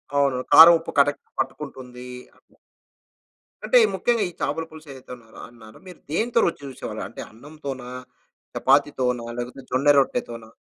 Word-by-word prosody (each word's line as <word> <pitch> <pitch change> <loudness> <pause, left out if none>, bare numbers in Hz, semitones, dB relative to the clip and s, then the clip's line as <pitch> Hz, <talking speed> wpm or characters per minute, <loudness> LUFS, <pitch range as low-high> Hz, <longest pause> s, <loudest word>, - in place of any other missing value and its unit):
అవును. 140 -2 +2 0.2
కారం, 165 +2 +10
ఉప్పు 165 - -8
కరెక్ట్‌గా 145 0 0
పట్టుకుంటుందీ 130 -3 -6 0.3
అట్లా. - - -31 1.1
అంటే - - +4 0.2
ముఖ్యంగా 235 -3 0
ఈ - - -12
చాపల 165 - -2
పులుసు 155 -1 -14
ఏదైతే 130 -1 -14
అన్నారో 115 -2 -17
అన్నారో 110 -2 -16
మీరు 180 - -12
దేనితో 230 +7 0
రుచి 165 - -2
చూసేవారు? 135 -2 -7
అంటే - - -10
అన్నంతోనా? 135 0 -9 0.7
చపాతీతోనా? 130 -3 +1
లేకపోతే 125 +2 -7
జొన్న 130 +3 0
రొట్టెతోనా? 115 -4 -3
135 Hz, 135 wpm, -23 LUFS, 125-155 Hz, 1.1 s, కారం